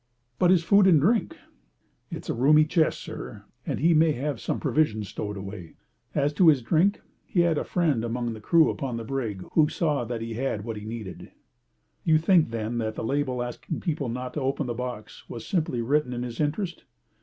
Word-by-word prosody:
"But 180 Hz, -, +4 dB
his 180 Hz, -2 st, +4 dB
food 200 Hz, +2 st, +5 dB
and 165 Hz, -5 st, +6 dB
drink?" 215 Hz, +10 st, +1 dB, 0.7 s
"It's -, -, -7 dB
a -, -, -1 dB
roomy 150 Hz, +5 st, +5 dB
chest, 155 Hz, 0 st, +1 dB
sir, 105 Hz, -3 st, -8 dB, 0.2 s
and -, -, -2 dB
he 165 Hz, +3 st, +4 dB
may 160 Hz, 0 st, +4 dB
have 140 Hz, -1 st, -3 dB
some -, -, -2 dB
provisions 120 Hz, -7 st, 0 dB
stowed 105 Hz, -1 st, -5 dB
away. 95 Hz, -3 st, -8 dB, 0.4 s
As 145 Hz, +1 st, +1 dB
to 170 Hz, +3 st, +4 dB
his 145 Hz, -6 st, +5 dB
drink, 170 Hz, -, +2 dB, 0.2 s
he 175 Hz, -, +1 dB
had 170 Hz, -3 st, +2 dB
a -, -, -2 dB
friend 155 Hz, -10 st, 0 dB
among 120 Hz, 0 st, -2 dB
the 110 Hz, -, -9 dB
crew 165 Hz, +7 st, +4 dB
upon 130 Hz, -4 st, -4 dB
the 115 Hz, -, -5 dB
brig 115 Hz, -6 st, -3 dB
who 155 Hz, -2 st, +4 dB
saw 150 Hz, -6 st, 0 dB
that 115 Hz, 0 st, -4 dB
he 115 Hz, 0 st, -4 dB
had 115 Hz, -3 st, -2 dB
what 115 Hz, -2 st, -4 dB
he 105 Hz, -, -8 dB
needed." 110 Hz, -4 st, -7 dB, 0.7 s
"You 160 Hz, -2 st, +4 dB
think, 165 Hz, -2 st, +3 dB
then, 115 Hz, +1 st, -3 dB
that 110 Hz, -1 st, -2 dB
the -, -, -4 dB
label 130 Hz, 0 st, -1 dB
asking 120 Hz, +6 st, -5 dB
people 150 Hz, -7 st, -2 dB
not 125 Hz, +2 st, -5 dB
to 150 Hz, -, -3 dB
open 135 Hz, +2 st, -1 dB
the 120 Hz, -, -2 dB
box 125 Hz, -2 st, -7 dB
was 115 Hz, -2 st, -7 dB
simply 155 Hz, -10 st, -1 dB
written 140 Hz, +1 st, +1 dB
in 120 Hz, 0 st, -3 dB
his 120 Hz, -2 st, -6 dB
interest?" 160 Hz, +4 st, -2 dB
135 Hz, 205 wpm, -26 LUFS, 115-155 Hz, 0.7 s, and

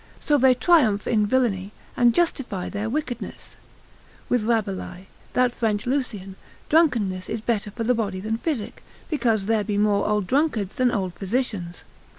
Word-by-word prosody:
So 295 Hz, -2 st, +2 dB
they 255 Hz, 0 st, +5 dB
triumph 250 Hz, -, +3 dB
in 210 Hz, -3 st, +2 dB
villainy, 210 Hz, -5 st, 0 dB, 0.2 s
and 240 Hz, -1 st, +5 dB
justify 265 Hz, -, 0 dB
their 210 Hz, +2 st, -3 dB
wickedness; 250 Hz, -3 st, -5 dB, 0.7 s
with 245 Hz, -4 st, +1 dB
Rabelais, 195 Hz, -5 st, -2 dB, 0.3 s
that 250 Hz, -1 st, +2 dB
French 215 Hz, -4 st, -1 dB
Lucian, 225 Hz, -8 st, -2 dB, 0.3 s
drunkenness 230 Hz, -, +2 dB
is 225 Hz, -, -2 dB
better 215 Hz, -1 st, -1 dB
for 230 Hz, +3 st, -5 dB
the 245 Hz, +2 st, +3 dB
body 205 Hz, -5 st, -2 dB
than 220 Hz, +3 st, -3 dB
physic, 275 Hz, -10 st, -3 dB, 0.3 s
because 230 Hz, -9 st, +1 dB
there 220 Hz, 0 st, +1 dB
be 205 Hz, -1 st, -2 dB
more 205 Hz, -1 st, +2 dB
old 210 Hz, -2 st, +1 dB
drunkards 250 Hz, -, 0 dB
than 255 Hz, -1 st, +2 dB
old 190 Hz, -6 st, -2 dB
physicians. 195 Hz, -4 st, -3 dB
220 Hz, 155 wpm, -24 LUFS, 200-250 Hz, 0.7 s, they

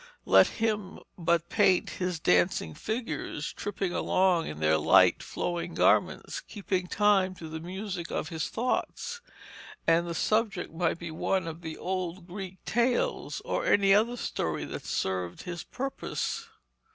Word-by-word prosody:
Let -, -, +7 dB
him 210 Hz, -4 st, -2 dB, 0.2 s
but 170 Hz, -1 st, +1 dB
paint 195 Hz, -4 st, +3 dB
his 180 Hz, -2 st, -2 dB
dancing 90 Hz, -, +2 dB
figures, 185 Hz, -, -4 dB
tripping 195 Hz, -3 st, -3 dB
along 185 Hz, -3 st, +2 dB
in 75 Hz, -, -6 dB
their 80 Hz, 0 st, +3 dB
light -, -, +5 dB
flowing 175 Hz, -1 st, -3 dB
garments, -, -, +2 dB
keeping 185 Hz, -3 st, -3 dB
time 195 Hz, -2 st, +3 dB
to 165 Hz, -, -8 dB
the 160 Hz, 0 st, -5 dB
music 180 Hz, 0 st, -5 dB
of 155 Hz, -, -3 dB
his 160 Hz, -1 st, -3 dB
thoughts, 360 Hz, -, -2 dB, 0.6 s
and 170 Hz, +1 st, +3 dB
the 170 Hz, -, -3 dB
subject 215 Hz, -2 st, 0 dB
might 165 Hz, 0 st, 0 dB
be 170 Hz, -1 st, -6 dB
one 185 Hz, +2 st, 0 dB
of 165 Hz, +1 st, -6 dB
the 160 Hz, -2 st, -6 dB
old 185 Hz, -1 st, -3 dB
Greek 190 Hz, 0 st, -8 dB
tales 250 Hz, -, 0 dB
or -, -, -1 dB
any 195 Hz, -1 st, +5 dB
other 230 Hz, +4 st, +3 dB
story -, -, -2 dB
that -, -, -7 dB
served 90 Hz, -2 st, -2 dB
his 175 Hz, -2 st, -5 dB
purpose. 275 Hz, -, -4 dB
180 Hz, 145 wpm, -29 LUFS, 165-205 Hz, 0.6 s, Let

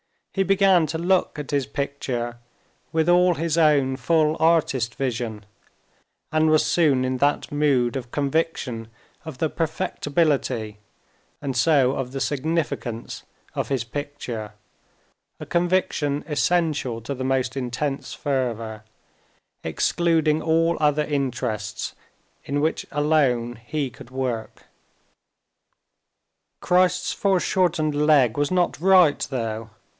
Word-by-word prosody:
He 195 Hz, -, 0 dB
began 195 Hz, -4 st, +4 dB
to 160 Hz, -, -3 dB
look 180 Hz, +1 st, +1 dB
at 145 Hz, -2 st, -6 dB
his 140 Hz, -3 st, 0 dB
picture 130 Hz, -4 st, -3 dB, 0.6 s
with 160 Hz, +1 st, +2 dB
all 180 Hz, 0 st, +5 dB
his 165 Hz, 0 st, -1 dB
own 145 Hz, -5 st, +3 dB
full 155 Hz, 0 st, +2 dB
artist 155 Hz, -8 st, +2 dB
vision, 115 Hz, -5 st, -3 dB, 0.9 s
and 155 Hz, 0 st, +3 dB
was 155 Hz, 0 st, +4 dB
soon 145 Hz, -7 st, +3 dB
in 130 Hz, 0 st, -1 dB
that 145 Hz, +3 st, +1 dB
mood 140 Hz, -5 st, +2 dB
of 125 Hz, -2 st, -7 dB
conviction 140 Hz, -6 st, -1 dB, 0.4 s
of 160 Hz, -5 st, -7 dB
the 160 Hz, -, 0 dB
perfectibility, 145 Hz, -, -1 dB, 0.6 s
and 135 Hz, -3 st, -3 dB
so 130 Hz, -1 st, +4 dB
of 135 Hz, -1 st, -4 dB
the 135 Hz, -, -3 dB
significance, 145 Hz, -5 st, -2 dB, 0.3 s
of -, -, -2 dB
his 135 Hz, -4 st, -1 dB
picture—a 115 Hz, -5 st, -9 dB
conviction 170 Hz, -5 st, 0 dB
essential 150 Hz, -6 st, 0 dB
to 115 Hz, +5 st, -4 dB
the 130 Hz, -1 st, -4 dB
most 130 Hz, 0 st, 0 dB
intense 135 Hz, +2 st, -3 dB
fervor, 115 Hz, -6 st, -2 dB, 0.8 s
excluding 160 Hz, -3 st, +1 dB
all 165 Hz, +1 st, +2 dB
other 150 Hz, 0 st, +2 dB
interests—in 130 Hz, 0 st, -4 dB
which 160 Hz, +2 st, -1 dB
alone 135 Hz, -6 st, +1 dB
he 145 Hz, -2 st, -2 dB
could 120 Hz, -, -13 dB
work. 130 Hz, -4 st, -4 dB, 2.0 s
Christ's 180 Hz, 0 st, +2 dB
foreshortened 175 Hz, -5 st, +1 dB
leg 145 Hz, -5 st, +4 dB
was 145 Hz, 0 st, +1 dB
not 180 Hz, -5 st, +1 dB
right, 180 Hz, -4 st, +5 dB
though. 115 Hz, -4 st, -4 dB
145 Hz, 110 wpm, -23 LUFS, 125-160 Hz, 2.0 s, all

